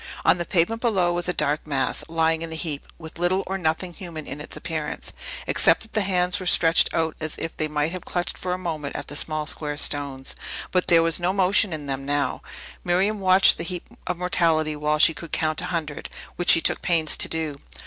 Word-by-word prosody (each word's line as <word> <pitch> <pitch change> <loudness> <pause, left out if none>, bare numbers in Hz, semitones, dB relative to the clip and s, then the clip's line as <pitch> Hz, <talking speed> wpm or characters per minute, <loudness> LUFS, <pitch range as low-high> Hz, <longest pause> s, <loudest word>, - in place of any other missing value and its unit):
On - - +4
the 175 - -2
pavement 190 +8 +1
below 190 -7 +2
was 175 0 -1
a - - +3
dark 150 -3 -1
mass, 135 -3 -1
lying 160 0 +1
in 165 -1 -5
a - - -4
heap, 155 -3 -4
with 160 0 -10
little 185 +2 +1
or 195 +1 -3
nothing 175 +1 -1
human 170 -5 -8
in 140 +2 -7
its - - -7
appearance, 155 -3 -4 0.3
except - - +3
that 220 - -12
the 215 - +2
hands 180 -1 +1
were 185 - -5
stretched 165 -1 +5
out, 160 -1 -1
as 155 -1 -4
if 165 - -5
they 155 - -2
might 150 +1 -1
have 185 -1 -6
clutched 175 0 -3
for 180 - -4
a 180 - -1
moment 155 -6 -5
at - - -5
the 145 - -6
small 155 0 -2
square 150 -1 -2
stones. 140 -3 0 0.4
But 180 -1 +1
there 165 -1 +5
was 165 0 +3
no 175 +2 0
motion 195 +1 +3
in 155 -2 -5
them 135 -1 -3
now. 145 +1 -1 0.4
Miriam 195 +4 +1
watched 190 0 +5
the - - -2
heap 175 +1 -5 0.2
of - - -2
mortality 165 -3 +1
while 150 +1 0
she 160 - +5
could 160 +1 -10
count 155 -1 0
a - - -4
hundred, 165 -5 -4 0.3
which 175 - -1
she 165 - +8
took - - +1
pains 165 -3 +3
to - - +3
do. 160 -3 -3
165 Hz, 225 wpm, -24 LUFS, 155-180 Hz, 0.4 s, she